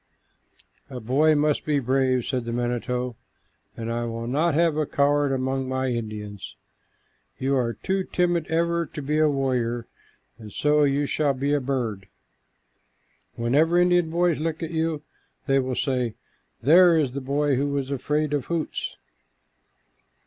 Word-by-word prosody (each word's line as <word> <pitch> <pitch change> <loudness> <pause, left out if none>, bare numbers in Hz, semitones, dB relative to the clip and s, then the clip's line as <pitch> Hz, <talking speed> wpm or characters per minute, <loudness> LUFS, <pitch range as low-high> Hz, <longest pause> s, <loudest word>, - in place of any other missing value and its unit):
"A 130 -2 -6
boy 140 +7 +3
must 150 0 +1
be 150 -1 +1
brave," 130 -1 +1
said 125 -3 -2
the 115 - -3
manito, 120 0 -2 0.6
"and 115 0 -4
I 120 0 -2
will 115 0 -4
not 145 +6 +1
have 165 -1 +3
a 155 -1 0
coward 145 0 +2
among 130 0 -1
my 130 0 -1
Indians. 105 -4 -5 0.8
You 135 +1 0
are 120 -3 0
too 190 0 -1
timid 175 -2 0
ever 170 0 0
to 150 - -7
be 150 +3 0
a 155 -1 +4
warrior, 125 -4 -1 0.5
and 105 -2 -10
so 150 +5 +3
you 140 +1 +1
shall 145 -1 0
be 140 +3 0
a 145 - +1
bird. 120 -7 -3 1.3
Whenever 145 +9 +2
Indian 175 -2 +3
boys 170 -1 +1
look 160 +1 -2
at 165 - -4
you, 160 -2 -1 0.4
they 135 -1 +3
will 130 -1 -2
say, 125 -5 -1 0.5
'There 170 +5 +6
is 145 -5 +1
the 140 +2 -5
boy 140 +1 +1
who 140 +2 0
was 140 -1 -2
afraid 150 +2 -1
of 145 -3 -1
Hoots.'" 170 -2 -3
140 Hz, 155 wpm, -25 LUFS, 125-155 Hz, 1.3 s, There